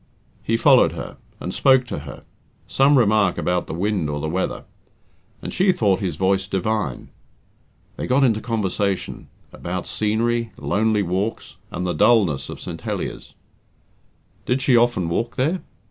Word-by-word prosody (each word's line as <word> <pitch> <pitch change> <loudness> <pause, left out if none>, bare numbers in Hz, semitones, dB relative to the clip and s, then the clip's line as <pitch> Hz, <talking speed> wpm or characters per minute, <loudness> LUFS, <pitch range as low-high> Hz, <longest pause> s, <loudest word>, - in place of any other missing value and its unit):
He 115 - 0
followed - - +5
her, - - -7 0.2
and 90 - -5
spoke 130 -2 +4
to 125 - -5
her 70 -1 -10 0.4
some 140 +1 +3
remark 105 -5 +3
about 90 0 -1
the - - -5
wind 95 -3 -1
or 75 0 -3
the 80 - -3
weather 90 +4 -2 0.8
and - - -5
she 190 +1 +3
thought 100 - +1
his 90 -6 -2
voice 95 +2 +1
divine. 100 - -2 0.9
They - - -4
got 130 +2 +3
into 110 -4 +2
conversation 100 -4 -2 0.3
about 90 +1 -5
scenery, 115 +1 -1
lonely 105 0 +1
walks, 95 +5 -3
and 90 - -4
the 90 - -1
dullness 95 - +3
of - - -7
St. - - -7
Heliers. - - -5 1.1
"Did 130 +1 +1
she 130 - +4
often 120 -7 +2
walk 115 +9 -2
there?" 155 +9 0
105 Hz, 150 wpm, -22 LUFS, 90-120 Hz, 1.1 s, followed